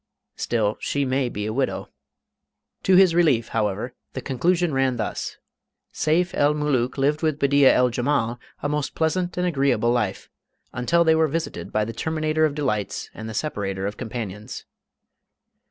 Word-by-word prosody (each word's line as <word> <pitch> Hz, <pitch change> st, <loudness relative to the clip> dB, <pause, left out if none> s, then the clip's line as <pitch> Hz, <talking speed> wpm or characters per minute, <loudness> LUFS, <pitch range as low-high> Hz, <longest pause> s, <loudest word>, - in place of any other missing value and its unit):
"Still, 110 Hz, -3 st, 0 dB
she 140 Hz, -1 st, -1 dB
may 130 Hz, -1 st, 0 dB
be 105 Hz, -2 st, -4 dB
a 110 Hz, -, -2 dB
widow!" 135 Hz, +2 st, -1 dB, 0.9 s
To 190 Hz, -, +4 dB
his 185 Hz, -2 st, +6 dB
relief, 150 Hz, -10 st, +3 dB
however, 110 Hz, +2 st, -1 dB, 0.2 s
the 130 Hz, -, -4 dB
conclusion 170 Hz, +6 st, +1 dB
ran 135 Hz, -1 st, +2 dB
thus; 110 Hz, -3 st, -4 dB, 0.6 s
"Seyf 175 Hz, +4 st, +1 dB
el 145 Hz, +1 st, +3 dB
Mulook 135 Hz, -4 st, 0 dB
lived 145 Hz, +3 st, +1 dB
with 155 Hz, -3 st, +1 dB
Bedeea 140 Hz, -1 st, +5 dB
el 125 Hz, 0 st, +3 dB
Jemal 120 Hz, -1 st, 0 dB, 0.2 s
a -, -, +1 dB
most 150 Hz, -1 st, -2 dB
pleasant 175 Hz, +3 st, 0 dB
and 180 Hz, -, +1 dB
agreeable 135 Hz, -8 st, +2 dB
life... 115 Hz, -6 st, -1 dB, 0.5 s
until 150 Hz, +7 st, +2 dB
they 160 Hz, -1 st, +4 dB
were 160 Hz, 0 st, +3 dB
visited 165 Hz, +2 st, -4 dB
by 105 Hz, 0 st, +1 dB
the 115 Hz, -, -5 dB
terminator 155 Hz, +1 st, 0 dB
of 145 Hz, -2 st, -1 dB
delights 105 Hz, -10 st, -2 dB
and 110 Hz, +1 st, -7 dB
the 110 Hz, -, -6 dB
separator 95 Hz, -9 st, -2 dB
of 100 Hz, +1 st, -3 dB
companions." 110 Hz, -1 st, -6 dB
135 Hz, 160 wpm, -24 LUFS, 115-155 Hz, 0.9 s, his